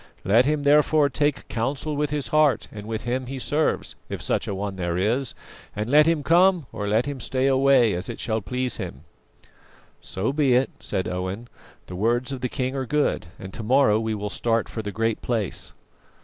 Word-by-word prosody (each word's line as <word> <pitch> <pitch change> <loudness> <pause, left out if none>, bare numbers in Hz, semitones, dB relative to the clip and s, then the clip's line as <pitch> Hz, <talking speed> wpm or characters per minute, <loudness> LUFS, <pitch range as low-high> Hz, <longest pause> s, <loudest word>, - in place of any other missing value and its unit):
Let 115 +7 +4
him, 150 -1 0
therefore, 150 0 +4
take 145 0 0
counsel 135 +6 -2
with 150 0 0
his 145 -1 -2
heart 150 -3 +3
and 105 -1 -9
with 110 -1 -4
Him 125 +1 -2
he 135 +1 -5
serves, 150 +4 0 0.2
if - - -4
such - - -1
a 100 - -2
One 100 0 -4
there 85 -2 -2
is, 115 +7 0 0.4
and 105 +1 -2
let 150 +2 +6
him 165 -3 +2
come 175 +1 +4
or 105 - -4
let 110 +4 +2
him 145 -2 -4
stay 130 +2 -1
away 135 -4 +4
as 90 +1 -4
it - - -6
shall 110 -1 -1
please 125 +4 -2
him.'" 65 - -6 1.0
"So 105 +8 -2
be 140 -4 +3
it," 130 +2 +2
said 95 - -2
Owen; 95 +6 -4 0.4
"the 90 - -8
words 120 +7 0
of 135 -2 -5
the 125 - -1
king 130 0 -2
are 130 -2 -3
good, 150 -10 0
and 95 0 -9
to - - -5
morrow 110 -2 +4
we 110 -1 -2
will 105 0 -4
start 115 +1 0
for 110 - -5
the 105 -1 -5
Great 115 +1 -1
Place." 110 -6 -2
125 Hz, 205 wpm, -24 LUFS, 105-140 Hz, 1.0 s, let